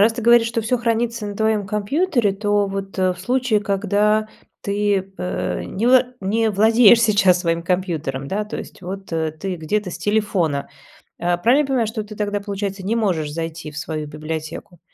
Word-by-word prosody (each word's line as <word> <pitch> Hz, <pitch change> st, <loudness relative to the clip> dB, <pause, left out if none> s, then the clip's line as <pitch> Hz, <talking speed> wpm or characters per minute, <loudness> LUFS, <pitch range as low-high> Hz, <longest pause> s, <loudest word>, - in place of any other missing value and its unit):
раз 220 Hz, +3 st, +5 dB
ты 235 Hz, -1 st, -5 dB
говоришь, 235 Hz, 0 st, +6 dB
что 230 Hz, 0 st, -1 dB
всё 240 Hz, +3 st, 0 dB
хранится 230 Hz, -1 st, -1 dB
на 205 Hz, -1 st, -6 dB
твоем 220 Hz, -2 st, +1 dB
компьютере, 220 Hz, -, +1 dB
то 205 Hz, 0 st, +1 dB
вот, 195 Hz, 0 st, -5 dB
э, 185 Hz, -1 st, +2 dB
в 180 Hz, -, -12 dB
случае, 245 Hz, +1 st, +1 dB
когда 210 Hz, +2 st, +1 dB, 0.3 s
ты, 200 Hz, -1 st, -1 dB
а, 180 Hz, -, -2 dB
э, -, -, -5 dB
не 220 Hz, +5 st, -2 dB
вла 255 Hz, 0 st, +7 dB, 0.2 s
не 220 Hz, +3 st, +1 dB
владеешь 225 Hz, +2 st, +6 dB
сейчас 195 Hz, -5 st, +4 dB
своим 165 Hz, -1 st, 0 dB
компьютером, 165 Hz, -7 st, -2 dB
да. 210 Hz, +2 st, -1 dB
То 210 Hz, -, -6 dB
есть -, -, -9 dB
вот, 190 Hz, 0 st, -7 dB
э, 160 Hz, -1 st, -1 dB
ты 185 Hz, +3 st, -5 dB
где-то 180 Hz, +4 st, -2 dB
с -, -, -7 dB
телефона. 195 Hz, -9 st, 0 dB, 0.5 s
А, 175 Hz, 0 st, +1 dB
правильно 245 Hz, +10 st, +4 dB
я 275 Hz, -, -5 dB
понимаю, 250 Hz, -5 st, +1 dB
что 220 Hz, -1 st, -4 dB
ты 210 Hz, 0 st, -10 dB
тогда, 205 Hz, -1 st, -1 dB
получается, 200 Hz, -1 st, -4 dB
не 220 Hz, +4 st, 0 dB
можешь 170 Hz, -9 st, 0 dB
зайти 165 Hz, -1 st, -5 dB
в 150 Hz, -, -11 dB
свою 155 Hz, -1 st, -4 dB
библиотеку? 155 Hz, +2 st, -6 dB
205 Hz, 195 wpm, -21 LUFS, 180-220 Hz, 0.5 s, вла